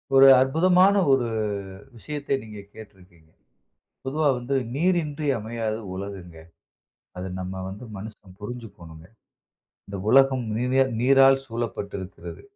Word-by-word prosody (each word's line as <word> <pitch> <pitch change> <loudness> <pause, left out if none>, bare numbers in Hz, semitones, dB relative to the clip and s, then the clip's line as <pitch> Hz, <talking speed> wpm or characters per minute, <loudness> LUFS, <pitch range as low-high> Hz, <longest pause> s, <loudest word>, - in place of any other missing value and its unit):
ஒரு 135 0 +8
அற்புதமான 180 +8 +4 0.2
ஒரு 130 -3 +2 0.7
விஷயத்த 145 +2 -3
நீங்க 105 -2 -10
கேட்டிருக்கீங்க. 90 -6 -16 0.8
பொதுவா 150 +2 +1
வந்து 130 +3 -2 0.2
"நீரின்றி 155 -3 0
அமையாது 110 0 -4
உலகுங்க." 95 -4 -8 0.8
அத 90 - -5 0.2
நம்ம 95 0 -6
வந்து 105 +6 -9
மனுசன் 95 -2 -11
புரிஞ்சுக்கணும்ங்க. 90 -8 -10 0.8
இந்த 100 0 -6
உலகம் 135 -2 +4
நீர 125 +3 +2 0.2
நீரால் 135 +1 +5
சூழப்பட்டு 115 -4 -5
இருக்கிறது. 90 -3 -9
115 Hz, 105 wpm, -24 LUFS, 95-135 Hz, 0.8 s, ஒரு